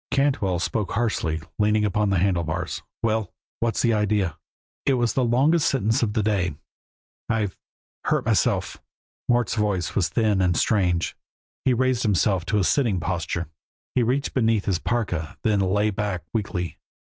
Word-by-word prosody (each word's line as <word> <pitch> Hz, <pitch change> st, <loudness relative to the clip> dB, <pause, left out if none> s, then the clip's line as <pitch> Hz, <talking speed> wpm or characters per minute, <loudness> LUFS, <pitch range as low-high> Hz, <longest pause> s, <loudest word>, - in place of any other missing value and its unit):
Cantwell 135 Hz, -10 st, +1 dB
spoke 100 Hz, +3 st, -2 dB
harshly, 95 Hz, -9 st, 0 dB, 0.2 s
leaning 105 Hz, 0 st, +3 dB
upon 105 Hz, 0 st, +1 dB
the 95 Hz, -, +2 dB
handle 90 Hz, -1 st, +2 dB
bars: 80 Hz, 0 st, -3 dB, 0.2 s
"Well! 110 Hz, -3 st, 0 dB, 0.3 s
What's 115 Hz, -3 st, 0 dB
the 115 Hz, -2 st, +3 dB
idea?" 105 Hz, -6 st, +1 dB, 0.5 s
It 135 Hz, -, +3 dB
was 120 Hz, -3 st, +1 dB
the 130 Hz, -, +1 dB
longest 140 Hz, +7 st, +3 dB
sentence 115 Hz, -1 st, +1 dB
of 110 Hz, -3 st, 0 dB
the 110 Hz, -, +1 dB
day. 95 Hz, -7 st, 0 dB, 0.7 s
"I've 105 Hz, -4 st, 0 dB, 0.5 s
hurt -, -, +1 dB
myself." -, -, +1 dB, 0.5 s
Mort's 120 Hz, -2 st, +2 dB
voice 100 Hz, -6 st, 0 dB
was 90 Hz, -4 st, +1 dB
thin 105 Hz, -4 st, +2 dB
and 90 Hz, -2 st, +2 dB
strange; 90 Hz, -6 st, +1 dB, 0.5 s
he 130 Hz, -, +4 dB
raised 130 Hz, 0 st, +1 dB
himself 95 Hz, -3 st, +1 dB
to 105 Hz, -, +1 dB
a 100 Hz, -, +2 dB
sitting 115 Hz, -5 st, +2 dB
posture, 85 Hz, 0 st, -2 dB, 0.5 s
and 120 Hz, -3 st, +2 dB
reached 135 Hz, +3 st, 0 dB
beneath 115 Hz, -4 st, +2 dB
his 95 Hz, -4 st, +1 dB
parka, 90 Hz, -10 st, -2 dB
then 105 Hz, -2 st, +2 dB
lay 100 Hz, +3 st, +2 dB
back 100 Hz, -4 st, -2 dB
weakly. 100 Hz, -6 st, -3 dB
105 Hz, 160 wpm, -24 LUFS, 95-115 Hz, 0.7 s, he